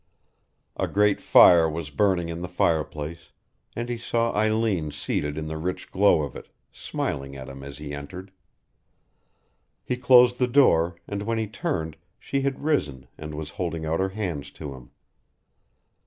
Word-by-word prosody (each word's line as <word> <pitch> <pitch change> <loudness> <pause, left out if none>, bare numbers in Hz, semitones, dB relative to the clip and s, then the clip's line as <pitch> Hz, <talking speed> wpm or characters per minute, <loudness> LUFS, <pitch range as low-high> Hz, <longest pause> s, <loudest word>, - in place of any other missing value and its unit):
A - - 0
great 105 0 +2
fire 85 -2 +7
was 80 -1 -5
burning 90 +1 +1
in 85 0 -5
the 90 - -4
fireplace, 80 -2 -2 0.5
and 120 +1 -3
he 120 -1 -3
saw 115 0 0
Eileen 110 -6 +1
seated 75 0 -3
in 80 - -3
the 80 0 -5
rich 90 +3 -4
glow 95 -5 +4
of 70 -4 -6
it, - - -9 0.2
smiling 70 0 -4
at 65 -1 -8
him 70 0 -9
as 70 0 -9
he 75 -1 -7
entered. 90 +7 -8 1.5
He 125 - -2
closed 125 -1 +6
the 125 - +3
door, 90 -11 +4
and 100 0 -4
when 115 +2 -1
he 110 - 0
turned 100 - -3 0.2
she 140 - -2
had 135 0 -2
risen 75 - -1
and 75 0 -8
was 75 -1 -6
holding 85 -2 -2
out 80 +1 -1
her 95 0 +1
hands 95 -8 -4
to 70 - -7
him. 65 -2 -13
85 Hz, 165 wpm, -25 LUFS, 75-110 Hz, 1.5 s, fire